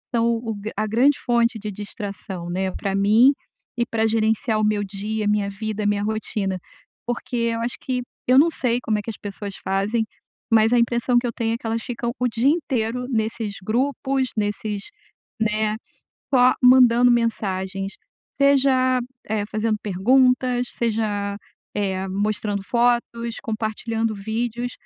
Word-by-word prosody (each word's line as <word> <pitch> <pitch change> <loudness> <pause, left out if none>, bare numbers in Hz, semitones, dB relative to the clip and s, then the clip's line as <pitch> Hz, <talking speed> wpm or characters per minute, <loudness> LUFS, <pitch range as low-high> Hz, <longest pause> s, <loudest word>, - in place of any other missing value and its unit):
são 230 0 +3
o 225 -1 -4
gra 210 +2 -6
a 215 0 0
grande 255 +6 +3
fonte 235 -1 +1
de 210 0 -5
distração, 195 -3 -6
né, 190 +1 -1
para 195 +1 -3
mim, 215 +7 +6 0.5
e 235 - +1
para 225 -2 0
gerenciar 220 0 +1
o - - +1
meu 210 -1 +1
dia, 210 +2 -3
a - - +1
minha 210 -1 +1
vida, 215 +1 -4
a - - +1
minha 205 0 +1
rotina, 210 -3 -2 0.5
porque 240 0 -3 0.2
eu 230 - -2
acho 240 +1 -1
que 250 -1 -2 0.3
eu 255 +1 +5
não 330 +3 +5
sei 245 -4 0
como 215 -2 0
é - - -3
que 230 - -6
as 215 - -5
pessoas 200 -1 -7
fazem, 205 +4 0 0.5
mas 220 0 +5
a - - +5
impressão 235 +1 +2
que 245 - -5
eu - - -2
tenho 225 -1 -1
é - - -4
que - - -15
elas 225 0 -1
ficam 235 -1 -3
o 250 - +2
dia 235 +3 0
inteiro 250 -6 -1
nesses 220 -3 -2
grupos, 265 +3 0
nesses, 205 0 -2 0.6
né, 215 0 +1 0.6
só 255 0 +6
mandando 250 -1 +7
mensagens, 195 -4 -1 0.4
seja 265 -2 +4 0.3
eh, 210 -1 -1
fazendo 215 0 -1
perguntas, 250 +5 +2
seja, 210 -3 -1 0.4
eh, 190 -2 -1
mostrando 205 0 -1
fotos, 235 0 0
compartilhando 220 0 -2
vídeos, 235 +4 -3
220 Hz, 160 wpm, -23 LUFS, 205-240 Hz, 0.6 s, mandando